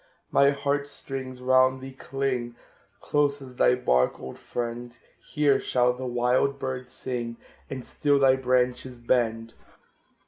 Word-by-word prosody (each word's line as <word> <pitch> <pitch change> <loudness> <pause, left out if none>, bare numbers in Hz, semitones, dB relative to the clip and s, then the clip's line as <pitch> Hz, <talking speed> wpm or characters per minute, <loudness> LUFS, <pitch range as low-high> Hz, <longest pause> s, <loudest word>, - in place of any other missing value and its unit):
My 140 - +5
heart 140 0 -1
strings 130 -3 -7
round 130 0 +4
thee 135 0 -9
cling, 130 -2 -3 0.5
Close 145 -1 +1
as 130 -2 -12
thy 125 - +4
bark, 65 - +1
old 65 - -9
friend! 120 0 -5 0.2
Here 145 -2 +2
shall 125 -1 +2
the 130 +1 -6
wild 125 +3 +1
bird 130 -2 -5
sing, 120 -2 -5 0.3
And 130 -2 -6
still 145 -1 +1
thy 135 -1 +5
branches 125 -1 0
bend. 115 -2 0
130 Hz, 135 wpm, -26 LUFS, 120-135 Hz, 0.5 s, My